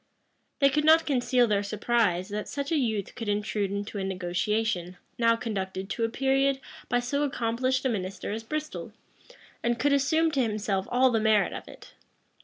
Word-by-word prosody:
[] - - -47
They 275 - +7
could 300 +2 +1
not 320 +1 +6
conceal 250 -3 +2
their 205 -3 +1
surprise, 205 -3 0
that 210 +1 -4
such 280 +1 -4
a - - +3
youth 220 -8 -1
could 225 -3 -5
intrude 205 -1 -1
into 200 +1 -4
a - - -2
negotiation, 185 0 -1 0.2
now 230 -1 +4
conducted 195 -4 -4
to 230 - -2
a 225 - +1
period 270 +2 +1 0.3
by 245 - +2
so 255 +4 -1
accomplished 255 -1 0
a - - +3
minister 195 -3 -3
as 220 +2 -3
Bristol, 305 +6 -5 0.7
and 235 0 0
could 285 +4 +2
assume 315 +4 +2
to 275 -3 +1
himself 210 -4 -1
all 255 +1 +4
the 225 - +2
merit 215 -2 +3
of - - -7
it. - - -13
225 Hz, 185 wpm, -27 LUFS, 205-265 Hz, 0.7 s, They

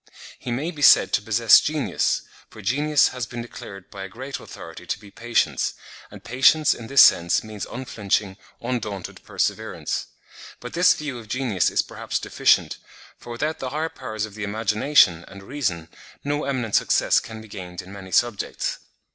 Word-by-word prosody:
He - - -7
may 145 +8 -2
be 150 -4 -10
said - - +6
to - - +3
possess 110 +2 +6
genius—for 145 -6 -2
genius 145 +7 +3
has 125 -3 -5
been 120 -1 -6
declared 100 -5 -11
by 100 -1 -7
a 95 - -7
great 130 +8 -7
authority - - -11
to - - -2
be 100 - -15
patience; 120 +1 0 0.3
and - - -13
patience, 135 +5 +4
in 115 - -9
this 140 +2 +8
sense, 85 0 +4
means 110 -2 -7
unflinching, 105 -5 -2 0.2
undaunted 110 -6 -5
perseverance. - - -2 0.5
But 125 - -9
this 175 +2 +5
view 145 -5 -5
of 110 - -12
genius 120 -5 0
is - - +1
perhaps - - -4
deficient; - - +2 0.4
for - - -13
without 150 +7 -2
the 130 - -4
higher 155 +4 -2
powers 110 -7 -5
of 110 - -12
the 105 +1 -6
imagination 105 - +3
and 100 0 -12
reason, 95 - -3 0.4
no 145 +1 -1
eminent 125 -6 -2
success - - +3
can 110 -1 -9
be 110 - -12
gained 90 -4 -8
in 95 +2 -12
many 95 -2 -10
subjects. 120 -2 0
115 Hz, 170 wpm, -23 LUFS, 100-135 Hz, 0.5 s, this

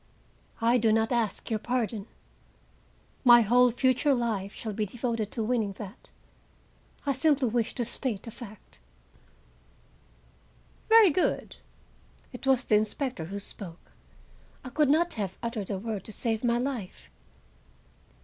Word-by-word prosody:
I 235 +2 +4
do 225 -1 +3
not 225 +2 +2
ask 235 -2 -1
your 220 - 0
pardon. 230 -3 -2 1.2
My 240 -2 +8
whole 245 +3 +5
future 260 +3 +2
life 215 -5 -2
shall 220 -2 -5
be 210 +1 -2
devoted 230 -1 -3
to 225 - -3
winning 220 -3 0
that; 200 +3 -10 1.0
I 280 - +2
simply 275 -1 +2
wish 230 0 -1
to 240 - 0
state 235 -3 -2
a 230 - -7
fact." 215 -2 -12 2.1
"Very 445 -5 +8
good!" 355 +5 -1 0.8
It 250 +2 -7
was 265 -1 +3
the 210 - +4
inspector 220 - -2
who 195 +5 -6
spoke; 190 -3 -8 0.7
I - - -5
could 300 +2 +2
not 340 +4 +3
have 195 -4 -4
uttered 230 -4 -3
a 195 - -2
word 210 -1 -4
to - - -7
save 225 +1 -2
my 235 -1 +2
life. 245 -7 -4
230 Hz, 140 wpm, -28 LUFS, 215-255 Hz, 2.1 s, My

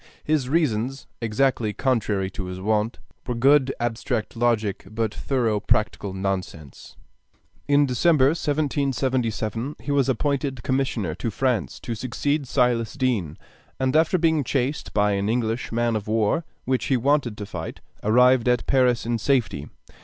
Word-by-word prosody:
His 150 -5 0
reasons, 135 -4 0 0.2
exactly 115 -1 +1
contrary 105 -8 0
to 95 - -6
his 90 0 -6
wont, 105 +3 0 0.3
were 125 - -1
good 135 +2 +4
abstract 120 0 -2
logic 110 -4 0
but 110 0 -2
thorough 115 -6 0
practical 105 -1 0
nonsense. 95 -6 -5 0.7
In 145 0 +4
December, 135 +2 +3
1777, 135 -6 -1
he 145 - -4
was 140 -2 +2
appointed 135 0 -1
commissioner 130 - -1
to 95 +7 -3
France 125 -1 -1
to 120 - -4
succeed 130 +5 -2
Silas 120 -4 +1
Deane, 115 - -1 0.4
and 130 +1 0
after 160 +3 +4
being 160 -3 +2
chased 135 +3 -2
by 105 0 +2
an 100 +1 0
English 115 0 -1
man 120 0 +1
of 105 -1 -3
war 110 +9 +1 0.2
(which 130 0 0
he 135 - +2
wanted 130 -3 +1
to 105 - -5
fight) 100 - -6 0.2
arrived 125 +3 +4
at 125 0 +1
Paris 125 -3 +2
in 120 0 -1
safety. 115 - 0
120 Hz, 145 wpm, -24 LUFS, 110-135 Hz, 0.7 s, good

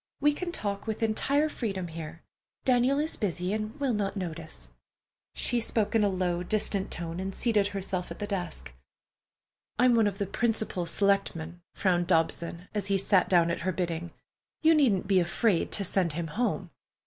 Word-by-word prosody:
"We 295 +1 +4
can 345 +4 -4
talk 200 -9 -3
with 220 +1 -2
entire 280 +7 +2
freedom 195 - -3
here. 165 0 -8 0.4
Daniel 255 +2 +4
is 310 +2 0
busy 180 -2 -2
and 215 +5 -4
will 275 -4 +1
not 205 -1 -1
notice." 160 - -6 0.7
She 240 - +1
spoke 220 -2 +1
in 225 -2 +4
a 205 - +3
low, 180 -2 -1
distant 200 +1 -1
tone, 165 0 -4
and 190 0 -4
seated 215 -4 +2
herself 195 -2 -3
at - - -7
the 205 - -3
desk. 175 - -4 1.0
"I'm 250 0 +5
one 225 -2 +4
of 200 -1 -3
the 200 - -1
principal 220 -4 -1
selectman," 175 -3 0
frowned 175 -3 +1
Dobson, 170 +2 0
as 205 -2 -1
he 195 0 +2
sat 195 0 +3
down 170 -2 +4
at - - -3
her 185 +2 0
bidding. 170 -1 -3 0.5
"You 320 +1 +7
needn't 255 - +3
be 195 -2 +4
afraid 180 +2 +1
to 200 - +1
send 180 -3 +1
him 165 0 -3
home." 235 +10 -1
195 Hz, 175 wpm, -28 LUFS, 175-220 Hz, 1.0 s, You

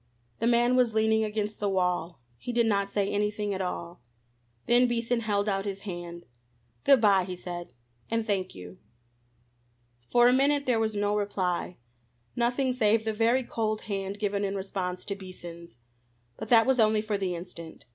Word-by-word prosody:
The 230 - +1
man 240 +1 +3
was 245 -3 +2
leaning 220 0 +3
against 210 0 -3
the 205 - 0
wall. 180 -3 -1 0.2
He 245 - -5
did 235 -1 +2
not 200 -2 +1
say 200 -1 0
anything 210 0 -1
at 190 - -3
all. 175 -3 -5 0.6
Then 245 +1 +4
Beason 235 0 0
held 205 -2 0
out 195 -1 0
his 195 -1 -5
hand. 175 -3 -7 0.6
"Good 275 -2 +6
bye," 200 -4 +4
he 180 0 -5
said, 175 -1 -7 0.4
"and 230 -1 0
thank 195 -4 -2
you." 90 0 -11 1.3
For 240 0 +5
a 250 - +5
minute 280 +2 +2
there 245 -3 +2
was 220 -1 -1
no 205 0 +1
reply, 185 -4 -2 0.6
nothing 250 +2 +1
save 220 -2 +2
the 220 - 0
very 230 +4 +2
cold 215 -2 -2
hand 195 -1 -4
given 205 -1 -1
in 200 0 -1
response 190 -2 -4
to 200 - -3
Beason's. 175 - -11 0.6
But 220 - -8
that 225 -2 +7
was 265 -1 +2
only 215 -1 +3
for 210 -2 -2
the 185 -2 -1
instant. 170 -5 -9
205 Hz, 175 wpm, -28 LUFS, 185-230 Hz, 1.3 s, that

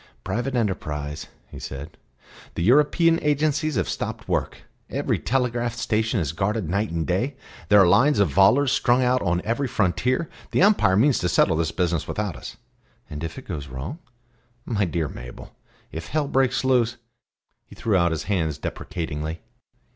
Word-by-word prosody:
"Private 120 +7 -2
enterprise," 75 -9 -2 0.2
he - - -9
said. 70 +4 -7 0.6
"The 85 - -1
European 150 - +4
agencies 150 0 +1
have 95 -5 0
stopped - - -4
work. - - -2 0.3
Every - - -1
telegraph 120 -1 -1
station 110 -1 0
is 75 -5 -1
guarded 95 +3 -1
night 100 +6 0
and 85 -1 -2
day. 120 +10 -1 0.3
There 105 0 +7
are 95 - +7
lines 120 +10 +4
of 100 -2 +4
volors 125 +8 +5
strung 125 +2 +3
out 125 0 +2
on 90 -1 0
every 120 +5 0
frontier. 125 - 0 0.2
The - - +2
Empire 195 - +4
means 135 +4 +4
to 90 - 0
settle 80 - +3
this 80 0 0
business 85 -3 -1
without 105 -6 -3
us." 60 - -9 0.5
"And 75 +2 -6
if 80 - -5
it 135 - -10
goes 75 -6 -5
wrong?" 65 - -6 0.7
"My 105 -4 0
dear 85 -2 -1
Mabel - - -10 0.4
if 80 +1 -6
hell 150 -1 -1
breaks 135 -1 +1
loose 120 -2 +2 0.3
" - - -54
he - - -14
threw 110 -3 0
out 85 -2 +3
his 80 -2 -3
hands 80 -7 -1
deprecatingly. 80 0 -5
105 Hz, 170 wpm, -24 LUFS, 85-125 Hz, 0.7 s, There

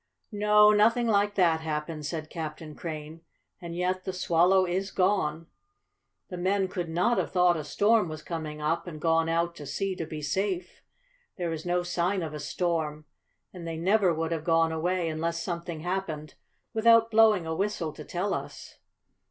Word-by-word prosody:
"No, 210 0 +5
nothing 225 +3 +4
like 205 -1 +2
that 170 -4 +3
happened," 155 -1 -4
said 155 +1 -5
Captain 155 -1 -6
Crane. 155 0 -7 0.4
"And 170 -1 -6
yet 185 +1 -1
the 190 - -4
Swallow 185 +1 +3
is 185 +2 -2
gone. 180 -5 0 0.8
The 180 - -6
men 190 +1 +1
could 175 -2 -4
not 180 +9 +2
have - - -2
thought 180 -1 +4
a 155 - -3
storm 205 +6 +2
was 155 -1 -7
coming 155 -3 -5
up, 165 +3 -1
and 155 -3 -7
gone 165 0 +2
out 170 +1 0
to 145 - -8
sea 195 +4 -2
to 165 - -4
be 155 -1 -6
safe. 185 +3 -2 0.6
There 175 -3 -2
is 160 +2 -6
no 175 0 +1
sign 175 +2 0
of 155 -2 -5
a 150 - -5
storm, 155 -4 -2 0.5
and 175 -3 -8
they 165 -1 -4
never 190 +2 +3
would 165 0 -2
have 160 -2 -2
gone 165 -1 +3
away, 175 +2 -1
unless 165 +1 -2
something 170 -2 -4
happened, 175 -4 -4 0.4
without 230 0 +5
blowing 215 -5 +5
a 160 - -2
whistle 175 -4 -2
to 150 - -9
tell 185 +6 -2
us." - - -7
170 Hz, 175 wpm, -28 LUFS, 160-190 Hz, 0.8 s, No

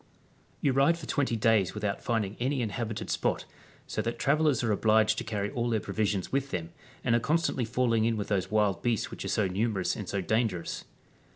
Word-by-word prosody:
^ - - -33 0.6
You 135 - +2
ride 140 +5 +4
for 165 - -8
2,0 130 -6 0
days 110 -4 +3
without 105 -1 -2
finding 110 -4 -1
any 130 +1 0
inhabited 110 0 -3
spot, - - 0 0.4
so - - -2
that 115 - -3
travellers 150 -3 +2
are 115 - +1
obliged 110 +1 +3
to - - -4
carry 105 -2 -2
all 120 -1 -1
their 110 -2 +1
pro - - -7
visions 105 -3 0
with 140 0 0
them, 85 -5 -4 0.3
and 120 - +2
are 120 - +4
constantly 155 -2 +1
falling 115 -1 +1
in 115 -1 +1
with 105 - -4
those 95 -2 0
wild 105 -2 +2
beasts 120 -4 0
which - - -6
are - - -4
so 105 - +1
numerous 100 0 0
and 105 - -6
so 100 - -1
dangerous. 105 -3 -1
110 Hz, 210 wpm, -29 LUFS, 105-125 Hz, 0.6 s, ride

